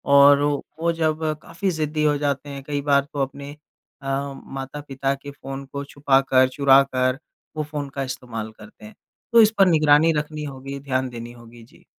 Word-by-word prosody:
और 140 Hz, 0 st, +7 dB
ओ 145 Hz, 0 st, +2 dB, 0.3 s
वो 170 Hz, 0 st, +2 dB
जब 160 Hz, -1 st, -1 dB, 0.2 s
काफ़ी 190 Hz, +3 st, -3 dB
ज़िद्दी 155 Hz, -1 st, -2 dB
हो 150 Hz, -1 st, +3 dB
जाते 145 Hz, 0 st, -2 dB
हैं 140 Hz, -1 st, -7 dB
कई 145 Hz, -1 st, -2 dB
बार 140 Hz, -1 st, +3 dB
तो 140 Hz, -, -2 dB
अपने 140 Hz, +2 st, -7 dB, 0.5 s
अ, 135 Hz, -, -8 dB, 0.4 s
माता-पिता 135 Hz, 0 st, -4 dB
के 140 Hz, +1 st, -10 dB
फ़ोन 135 Hz, 0 st, -8 dB
को 140 Hz, +1 st, -6 dB
छुपाकर, 135 Hz, -2 st, +3 dB
चुराकर 135 Hz, -2 st, +3 dB, 0.4 s
वो 155 Hz, -, 0 dB
फ़ोन 145 Hz, -2 st, -5 dB
का 135 Hz, -, -1 dB
इस्तेमाल 120 Hz, -4 st, -6 dB
करते 215 Hz, 0 st, -14 dB
हैं। 215 Hz, -, -13 dB, 0.4 s
तो 230 Hz, -, +8 dB
इस 215 Hz, -, +5 dB
पर 195 Hz, -, +7 dB
निगरानी 155 Hz, -1 st, +5 dB
रखनी 150 Hz, 0 st, -4 dB
होगी। 135 Hz, 0 st, -7 dB
ध्यान 130 Hz, -2 st, -2 dB
देनी 120 Hz, 0 st, -8 dB
होगी। 120 Hz, -1 st, -15 dB
जी। 115 Hz, -, -21 dB
140 Hz, 180 wpm, -23 LUFS, 135-150 Hz, 0.5 s, तो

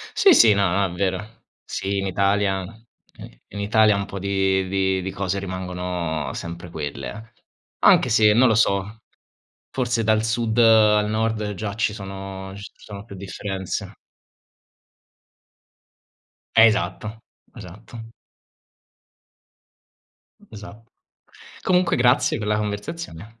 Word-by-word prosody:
Sì, 385 Hz, -4 st, +6 dB
sì, 110 Hz, -, +7 dB
no, 100 Hz, -2 st, +2 dB
no, 100 Hz, +3 st, +1 dB
è -, -, -8 dB
vero. 100 Hz, +4 st, -4 dB, 0.2 s
Sì, 100 Hz, +1 st, -3 dB
in 95 Hz, -, -2 dB
Italia, 100 Hz, 0 st, +1 dB
n 110 Hz, +4 st, -14 dB, 0.6 s
in 100 Hz, -, -7 dB
Italia 105 Hz, 0 st, +3 dB
un 100 Hz, -, -2 dB
po' 100 Hz, 0 st, -7 dB
di 95 Hz, -1 st, 0 dB
di 95 Hz, 0 st, 0 dB
di 95 Hz, +1 st, -4 dB
cose 95 Hz, 0 st, -3 dB
rimangono 90 Hz, -4 st, -4 dB
sempre 85 Hz, +1 st, -7 dB
quelle. 75 Hz, -, -7 dB, 0.5 s
Anche 125 Hz, -, +5 dB
se 110 Hz, -2 st, +5 dB
non 125 Hz, +4 st, +5 dB
lo 110 Hz, -, +3 dB
so, 105 Hz, 0 st, +1 dB, 0.7 s
forse 120 Hz, -3 st, -1 dB
dal 110 Hz, 0 st, +2 dB
sud 110 Hz, 0 st, -1 dB
al 110 Hz, -2 st, +5 dB
nord 110 Hz, -1 st, -1 dB
già 100 Hz, +1 st, -5 dB
ci 110 Hz, -1 st, 0 dB
sono 95 Hz, -1 st, -8 dB
ci 100 Hz, 0 st, -10 dB
sono 100 Hz, -1 st, -11 dB
più 100 Hz, -, -11 dB
differenze. 95 Hz, 0 st, -5 dB, 2.6 s
Eh, 110 Hz, 0 st, +8 dB
esatto, 110 Hz, +1 st, -1 dB, 0.4 s
esatto. 110 Hz, +3 st, -11 dB, 2.4 s
Esat 105 Hz, +1 st, -11 dB, 0.8 s
Comunque 180 Hz, -1 st, +2 dB
grazie 125 Hz, +2 st, +3 dB
per 105 Hz, -, -5 dB
la 105 Hz, 0 st, +1 dB
conversazione. 105 Hz, -, -6 dB
100 Hz, 120 wpm, -22 LUFS, 95-110 Hz, 2.6 s, Eh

